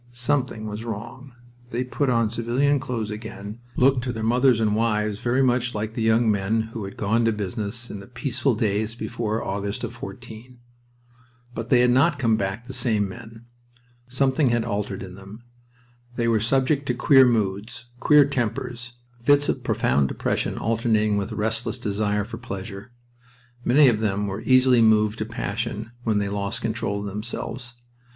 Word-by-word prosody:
Something 125 Hz, -2 st, -1 dB
was 105 Hz, +1 st, -5 dB
wrong. 120 Hz, +4 st, -7 dB, 0.4 s
They 125 Hz, +1 st, -1 dB
put 130 Hz, +2 st, -1 dB
on 115 Hz, -3 st, +2 dB
civilian 125 Hz, +5 st, +1 dB
clothes 115 Hz, -4 st, -3 dB
again, 105 Hz, 0 st, -7 dB, 0.2 s
looked 130 Hz, -1 st, +3 dB
to 125 Hz, -, -1 dB
their 110 Hz, -2 st, -5 dB
mothers 125 Hz, +1 st, +3 dB
and 105 Hz, -2 st, +2 dB
wives 105 Hz, -2 st, 0 dB
very 125 Hz, +3 st, +1 dB
much 125 Hz, -1 st, +1 dB
like 110 Hz, +1 st, -3 dB
the 115 Hz, -, -3 dB
young 110 Hz, 0 st, +3 dB
men 105 Hz, +2 st, +1 dB
who 110 Hz, -4 st, -4 dB
had 95 Hz, -, -9 dB
gone 110 Hz, +3 st, +1 dB
to 115 Hz, -, +3 dB
business 105 Hz, +3 st, -4 dB
in 105 Hz, -, -6 dB
the 100 Hz, -, -11 dB
peaceful 130 Hz, 0 st, -1 dB
days 110 Hz, +1 st, -1 dB
before 115 Hz, -2 st, -3 dB
the -, -, -4 dB
August 100 Hz, +3 st, -3 dB
of 120 Hz, -1 st, -4 dB
'14. 120 Hz, -1 st, -10 dB, 1.0 s
But 115 Hz, 0 st, -5 dB
they 125 Hz, -2 st, +5 dB
had 125 Hz, 0 st, +4 dB
not 140 Hz, +5 st, +3 dB
come 115 Hz, -5 st, +2 dB
back 100 Hz, +2 st, -3 dB
the 130 Hz, -, -7 dB
same 115 Hz, -5 st, +1 dB
men. 115 Hz, +2 st, -11 dB, 0.6 s
Something 130 Hz, +2 st, +2 dB
had 120 Hz, -1 st, +1 dB
altered 100 Hz, -3 st, -3 dB
in 90 Hz, -1 st, -9 dB
them. 100 Hz, +4 st, -12 dB, 0.7 s
They 120 Hz, -1 st, 0 dB
were 115 Hz, -1 st, +3 dB
subject 135 Hz, +5 st, +1 dB
to 125 Hz, -, 0 dB
queer 130 Hz, +1 st, +6 dB
moods, 110 Hz, +1 st, -1 dB
queer 150 Hz, +1 st, +6 dB
tempers, 120 Hz, -2 st, -3 dB, 0.3 s
fits 145 Hz, +3 st, +4 dB
of -, -, -1 dB
profound 70 Hz, -1 st, +1 dB
depression -, -, -2 dB
alternating 110 Hz, -2 st, +1 dB
with 100 Hz, +2 st, -2 dB
a -, -, -5 dB
restless 110 Hz, +3 st, -1 dB
desire 105 Hz, -2 st, -1 dB
for 115 Hz, +2 st, -8 dB
pleasure. 100 Hz, -1 st, -7 dB, 0.7 s
Many 140 Hz, +4 st, +6 dB
of 115 Hz, -4 st, +3 dB
them 105 Hz, -2 st, 0 dB
were 100 Hz, -1 st, -4 dB
easily 130 Hz, -2 st, +5 dB
moved 110 Hz, 0 st, +3 dB
to 110 Hz, -, -1 dB
passion 115 Hz, -1 st, -4 dB
when 110 Hz, -3 st, +1 dB
they 100 Hz, -1 st, 0 dB
lost 100 Hz, 0 st, -3 dB
control 110 Hz, -3 st, -2 dB
of -, -, -5 dB
themselves. 115 Hz, +4 st, -5 dB
115 Hz, 175 wpm, -24 LUFS, 105-125 Hz, 1.0 s, queer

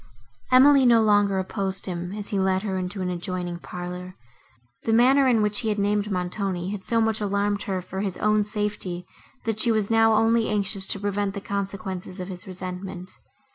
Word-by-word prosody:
Emily 270 Hz, +2 st, +7 dB
no 240 Hz, -2 st, +6 dB
longer 205 Hz, -2 st, +3 dB
opposed 190 Hz, 0 st, -2 dB
him, 175 Hz, -1 st, -4 dB
as 210 Hz, -1 st, -5 dB
he 200 Hz, -, 0 dB
led 190 Hz, 0 st, +1 dB
her 195 Hz, -3 st, -2 dB
into 185 Hz, +1 st, -3 dB
an 180 Hz, -, -1 dB
adjoining 175 Hz, 0 st, -4 dB
parlour; 180 Hz, +1 st, -7 dB, 0.7 s
the 225 Hz, -, 0 dB
manner, 260 Hz, +4 st, +5 dB
in 230 Hz, -4 st, +3 dB
which 210 Hz, -1 st, +1 dB
he 225 Hz, -, -1 dB
had 210 Hz, -, 0 dB
named 205 Hz, +1 st, +1 dB
Montoni, 185 Hz, 0 st, -2 dB
had 205 Hz, -2 st, -5 dB
so 230 Hz, +3 st, +1 dB
much 220 Hz, -1 st, +1 dB
alarmed 205 Hz, 0 st, 0 dB
her 185 Hz, -2 st, -1 dB
for 190 Hz, +2 st, -6 dB
his 195 Hz, -3 st, -3 dB
own 210 Hz, 0 st, +2 dB
safety, 205 Hz, -4 st, -3 dB, 0.4 s
that 220 Hz, -1 st, -1 dB
she 235 Hz, -, +3 dB
was 215 Hz, -1 st, 0 dB
now 225 Hz, 0 st, +5 dB
only 225 Hz, +1 st, +3 dB
anxious 200 Hz, -2 st, 0 dB
to 200 Hz, -, 0 dB
prevent 205 Hz, 0 st, -1 dB
the -, -, -3 dB
consequences 195 Hz, -2 st, -5 dB
of 180 Hz, +1 st, -5 dB
his 180 Hz, -2 st, -6 dB
just -, -, -9 dB
resentment. 185 Hz, 0 st, -6 dB
200 Hz, 195 wpm, -25 LUFS, 185-215 Hz, 0.7 s, Emily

